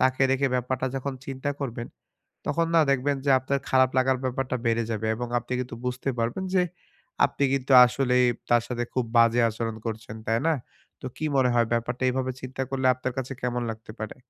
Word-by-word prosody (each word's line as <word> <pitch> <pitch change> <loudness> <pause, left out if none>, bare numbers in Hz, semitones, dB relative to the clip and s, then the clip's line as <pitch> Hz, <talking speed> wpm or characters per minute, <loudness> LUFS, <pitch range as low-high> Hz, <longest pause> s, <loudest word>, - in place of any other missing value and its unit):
তাকে 130 +1 +2
রেখে 135 +1 +2
ব্যাপারটা 125 +1 -1
যখন 135 +1 -3
চিন্তা 135 +1 -3
করবেন। 120 -3 -4 0.6
তখন 165 0 +1
না 165 - +7
দেখবেন 140 +1 +1
যে 140 - +2
আপনার 135 +2 -1
খারাপ 130 -1 +4
লাগার 130 0 +3
ব্যাপারটা 130 0 -1
বেড়ে 115 0 +2
যাবে 110 0 -2
এবং 120 +2 -4
আপনি 120 +1 -7
কিন্তু 125 -1 -5
বুঝতে 125 +2 -2
পারবেন। 115 +11 -1
যে 180 - +5 0.6
আপনি - - -1
কিন্তু 135 0 0
আসলেই 125 0 +2 0.2
তার 120 -1 +5
সাথে 120 -1 -2
খুব 130 -2 0
বাজে 115 +1 +5
আচরণ 115 0 -4
করছেন। 110 0 -5
তাই 115 +1 +2
না? 165 - +4 0.5
তো - - -7
কি 155 - -4
মনে 130 -2 +4
হয় 120 -1 +3
ব্যাপারটা 120 +2 -1
এভাবে 130 0 -1
চিন্তা 130 +1 -5
করলে 130 -1 0
আপনার 130 0 -4
কাছে 130 +1 -3
কেমন 125 -1 -1
লাগতে 110 0 -9
পারে? 110 +3 -5
125 Hz, 195 wpm, -26 LUFS, 120-135 Hz, 0.6 s, না